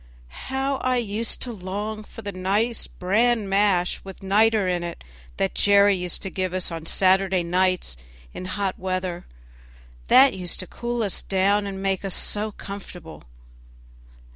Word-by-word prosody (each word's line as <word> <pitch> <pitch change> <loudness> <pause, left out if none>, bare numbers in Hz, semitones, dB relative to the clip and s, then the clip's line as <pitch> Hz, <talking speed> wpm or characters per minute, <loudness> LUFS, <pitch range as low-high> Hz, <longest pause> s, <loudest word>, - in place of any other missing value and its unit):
How 270 +1 0
I 255 -1 +1
used 225 0 -1
to 245 - -4
long 205 +2 -4
for 225 - -12
the 200 - -4
nice 200 +5 -1
bran 215 +4 +1
mash 195 -2 +2
with 195 0 -10
niter 210 +1 +3
in 180 -1 0
it 170 0 -6 0.3
that 95 - 0
Jerry 200 0 +5
used 180 -2 -3
to 195 - -4
give 185 -1 -2
us 185 -1 -1
on 165 -1 -5
Saturday 190 0 +3
nights 180 - 0 0.4
in - - -6
hot 190 +1 -2
weather, 185 -1 -3 0.8
that 270 0 +7
used 180 -2 -3
to - - -7
cool 240 +3 -3
us 200 - -2
down 200 +2 +1
and 195 -1 -5
make 195 0 0
us 195 -2 -1
so 215 +1 -1
comfortable. 180 - -9
195 Hz, 155 wpm, -24 LUFS, 185-210 Hz, 0.8 s, that